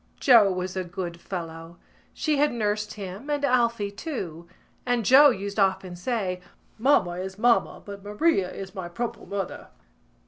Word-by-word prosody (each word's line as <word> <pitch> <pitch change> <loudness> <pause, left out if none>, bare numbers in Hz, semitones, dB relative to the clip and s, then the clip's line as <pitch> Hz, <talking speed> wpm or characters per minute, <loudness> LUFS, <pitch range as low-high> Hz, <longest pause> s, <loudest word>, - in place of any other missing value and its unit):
Joe 230 -7 +6
was 185 0 -3
a 185 - -1
good 175 -1 -6
fellow. 165 -2 -7 0.3
She 305 -2 0
had 295 +1 +3
nursed 210 -2 -1
him 200 +6 -7
and 290 -1 -1
Alphy 235 -6 +1
too; 175 - -6 0.4
and 245 -3 0
Joe 285 +5 +8
used 200 -3 -3
often 190 -2 +1
say: 185 -2 -2 0.4
"Mamma 190 -9 +3
is 190 +1 -6
mamma 235 +2 +2
but 200 -1 -9
Maria 205 - +1
is 190 -1 -8
my 185 -4 -6
proper 235 +7 -5
mother." 195 -2 -5
200 Hz, 150 wpm, -26 LUFS, 185-240 Hz, 0.4 s, Joe